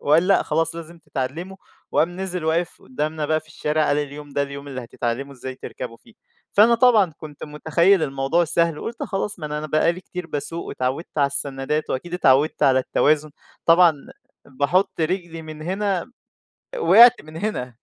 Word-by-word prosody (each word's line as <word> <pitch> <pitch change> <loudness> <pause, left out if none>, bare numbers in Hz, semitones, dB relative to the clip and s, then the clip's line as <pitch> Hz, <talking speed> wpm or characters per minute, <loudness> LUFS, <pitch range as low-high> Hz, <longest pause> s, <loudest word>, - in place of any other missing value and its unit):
وقال: 160 +5 +3
"لأ 195 - +4
خلاص 165 +2 0
لازم 170 +1 -9
تتعلّموا." 155 +6 -5 0.4
وقام 175 +3 +1
نزل 180 -3 -3
واقف 165 +2 -1
قُدّامنا 150 +3 -3
بقى 155 0 +1
في 155 - -22
الشارع 150 +1 0
قال: 145 - +2
"اليوم 145 0 -6
ده 140 - 0
اليوم 140 0 -7
اللي 130 -3 -6
هتتعلّموا 120 +4 -4
إزاي 130 0 -7
تركبوا 125 -2 -8
فيه." 230 - -22 0.4
فأنا 225 +3 +6
طبعًا 225 -8 +4
كنت 150 -2 -9
مُتخيّل 160 +4 +2
الموضوع 135 +5 +1
سهل 165 -1 +1
وقُلت 235 - -6
خلاص 195 -1 -3
ما 155 - -5
أنا 150 0 -3
أنا 155 - -5
بقى 155 +3 +2
لي 180 - -9
كتير 180 -2 -7
باسوق 165 +2 -4
واتعوّدت 130 +6 -3
على 140 - +4
السنّادات، 140 +2 -2
وأكيد 175 +7 -3
اتعوّدت 145 -3 +3
على 130 -1 +5
التوازن. 150 +3 +1 0.4
طبعًا 170 -1 +6 0.5
باحُط 145 +7 0
رجلي 165 -1 -2
من 155 -1 -9
هنا 190 +3 -2 0.7
وقعت 240 - +7
من 155 +1 -12
هنا 165 - -3
155 Hz, 170 wpm, -22 LUFS, 140-175 Hz, 0.7 s, وقعت